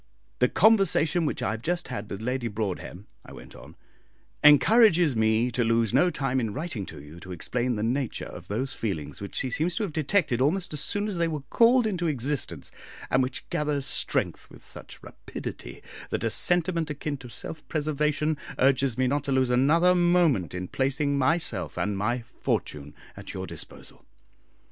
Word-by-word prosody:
"The 125 - +4
conversation 180 -6 +3
which 140 - -3
I - - 0
have 110 0 -5
just 175 +3 -2
had 105 -4 -5
with 100 - -6
Lady 125 0 -1
Broadhem," 105 -3 -4 0.2
I - - -12
went - - -12
on, - - -13 0.7
"encourages 170 - +6
me 110 +2 +2
to 120 +1 0
lose 115 -1 +1
no 160 +8 +4
time 135 -5 -1
in 110 -4 -2
writing 130 - -4
to 80 - -9
you 75 +4 -12
to 95 +1 -10
explain 120 +8 -1
the 105 - -2
nature 125 +2 -1
of - - -10
those 130 +6 -2
feelings 95 -9 -4
which 100 - -7
she 130 - -2
seems 165 +8 0
to 225 - -1
have 185 -7 -4
detected 155 -4 +1
almost 175 +5 0
as 150 - -3
soon 205 +8 -1
as 200 -4 -2
they 170 0 +1
were 155 -4 -4
called 240 +1 +5
into 180 -5 -1
existence, 140 -1 -2 0.4
and 130 - +4
which 130 0 -3
gather 150 -3 0
strength 135 - +1
with - - -15
such - - -8
rapidity - - -8 0.3
that - - -2
a - - +1
sentiment 170 -2 +1
akin 150 0 -4
to 125 -2 -11
self 155 +7 -6
preservation 150 0 0 0.2
urges 135 -2 +2
me 130 - +2
not 140 +2 0
to 140 - -2
lose 130 -2 +2
another 160 +8 +4
moment 175 - +2
in 90 0 -4
placing 140 +4 0
myself 140 +5 0
and 105 0 -1
my 120 +5 -1 0.2
fortune 75 0 -2 0.2
at - - -9
your - - -4
disposal. - - -10
135 Hz, 180 wpm, -26 LUFS, 115-165 Hz, 0.7 s, encourages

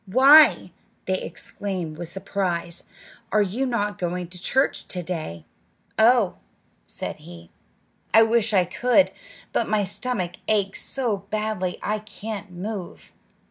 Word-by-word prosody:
"Why!" 275 +9 +7 0.3
they 190 0 -1
exclaimed 185 -6 -5
with 175 - -5
surprise, 175 -2 -3 0.5
"are 215 - +4
you 230 +8 -2
not 210 -4 -1
going 175 0 -3
to 180 -1 -9
church 265 +7 +1
to 180 -1 -2
day?" 155 - -5 0.5
"Oh," 225 -3 +4 0.5
said - - -5
he, 85 -1 -13 0.6
"I 225 - +7
wish 225 0 +2
I 185 -4 +4
could; 250 - +3 0.4
but 230 - 0
my 210 -1 +2
stomach 190 -2 -2
aches 200 -3 +1
so 240 -6 -1
badly 215 -4 -2
I 215 +1 -1
can't 210 0 -7
move!" 185 0 -7
200 Hz, 130 wpm, -24 LUFS, 180-220 Hz, 0.6 s, Why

